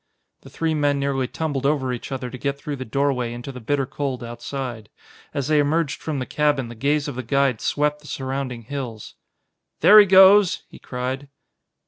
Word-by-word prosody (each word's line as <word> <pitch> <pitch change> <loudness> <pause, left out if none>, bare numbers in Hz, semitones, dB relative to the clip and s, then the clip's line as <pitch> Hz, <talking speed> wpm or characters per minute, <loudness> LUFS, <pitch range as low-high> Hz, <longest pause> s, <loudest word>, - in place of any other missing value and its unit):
The - - -14
three 160 -1 -1
men 145 -2 +1
nearly 135 -2 -1
tumbled 145 -2 -3
over 135 -3 +1
each 125 - -7
other 125 -2 -4
to 130 - -7
get 140 +1 -2
through 145 0 -5
the 130 - -6
doorway 125 -1 0
into 120 +3 -7
the 125 - -9
bitter 135 +4 0
cold 130 -2 -4
outside. 120 -1 -6 0.4
As 140 -2 -3
they 155 -1 +3
emerged 150 +1 0
from 155 -3 -3
the 130 - -3
cabin 145 -4 0
the - - -7
gaze 145 +5 0
of 145 - -4
the 130 - -4
guide 135 -1 +1
swept 150 0 0
the 150 - -14
surrounding 130 -3 -4
hills. 120 -4 -6 0.7
"There 215 - +9
he 205 - +7
goes!" 190 0 +6
he - - -14
cried. 130 +2 -5
140 Hz, 190 wpm, -22 LUFS, 125-145 Hz, 0.7 s, There